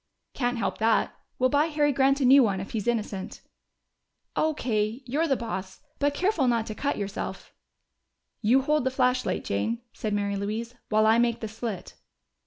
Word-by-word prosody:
"Can't 245 Hz, -1 st, -1 dB
help 230 Hz, -, -2 dB
that. 225 Hz, +1 st, +2 dB, 0.2 s
We'll 255 Hz, 0 st, +2 dB
buy 290 Hz, +2 st, +3 dB
Harry 295 Hz, -2 st, +2 dB
Grant 275 Hz, +1 st, +2 dB
a -, -, +3 dB
new 270 Hz, +2 st, +8 dB
one 200 Hz, -6 st, +1 dB
if 190 Hz, -, -6 dB
he's 220 Hz, -2 st, -3 dB
innocent." 215 Hz, -5 st, -2 dB, 0.9 s
"O.K. 240 Hz, -6 st, 0 dB
You're 295 Hz, +7 st, 0 dB
the 275 Hz, -, +2 dB
boss. 190 Hz, -4 st, -5 dB, 0.2 s
Be 285 Hz, -, +3 dB
careful 320 Hz, -1 st, +1 dB
not 230 Hz, -2 st, +2 dB
to 215 Hz, -, -5 dB
cut 285 Hz, +6 st, -2 dB
yourself." 200 Hz, 0 st, -5 dB, 0.9 s
"You 245 Hz, +5 st, +4 dB
hold 300 Hz, 0 st, +2 dB
the 260 Hz, -, +2 dB
flashlight, 255 Hz, -1 st, +1 dB
Jane," 225 Hz, -, -1 dB
said 215 Hz, -1 st, -3 dB
Mary 200 Hz, 0 st, -1 dB
Louise. 220 Hz, +4 st, -3 dB, 0.2 s
"While 215 Hz, 0 st, +3 dB
I 220 Hz, +1 st, +5 dB
make 235 Hz, -1 st, +2 dB
the 220 Hz, -, -4 dB
slit." 220 Hz, -3 st, -6 dB
235 Hz, 175 wpm, -27 LUFS, 215-270 Hz, 0.9 s, new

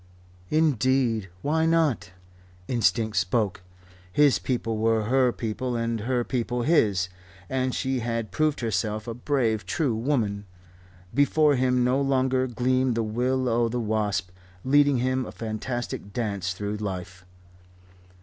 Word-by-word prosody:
Indeed, 130 Hz, -8 st, +2 dB
why 160 Hz, +2 st, +2 dB
not? 160 Hz, -, +1 dB, 0.6 s
Instinct 115 Hz, -4 st, +1 dB
spoke. 95 Hz, +1 st, 0 dB, 0.5 s
His 145 Hz, +4 st, +4 dB
people 115 Hz, -4 st, -2 dB
were 110 Hz, 0 st, +2 dB
her 125 Hz, +2 st, +3 dB
people 120 Hz, +2 st, -3 dB
and 115 Hz, -1 st, -1 dB
her 120 Hz, +3 st, 0 dB
people 120 Hz, -1 st, -2 dB
his. 105 Hz, -, +3 dB, 0.4 s
And 130 Hz, -1 st, 0 dB
she 130 Hz, -1 st, -1 dB
had 115 Hz, -2 st, -3 dB
proved 155 Hz, -2 st, 0 dB
herself 110 Hz, 0 st, -1 dB
a 115 Hz, -, -3 dB
brave, 120 Hz, -4 st, 0 dB
true 130 Hz, -, 0 dB
woman. 110 Hz, -5 st, -1 dB, 0.7 s
Before 145 Hz, +3 st, +4 dB
him 125 Hz, -1 st, +2 dB
no 130 Hz, +3 st, +2 dB
longer 130 Hz, -1 st, +1 dB
gleamed 125 Hz, +1 st, +1 dB
the 115 Hz, -, 0 dB
will 125 Hz, +4 st, 0 dB
o' 115 Hz, 0 st, +2 dB
the 125 Hz, +2 st, -2 dB
wisp 105 Hz, -5 st, -1 dB, 0.3 s
leading 145 Hz, 0 st, +4 dB
him 130 Hz, +1 st, 0 dB
a -, -, -7 dB
fantastic 115 Hz, -1 st, -4 dB
dance 100 Hz, -6 st, -2 dB
through 105 Hz, +2 st, -4 dB
life. 95 Hz, -3 st, -6 dB
120 Hz, 130 wpm, -26 LUFS, 110-130 Hz, 0.7 s, His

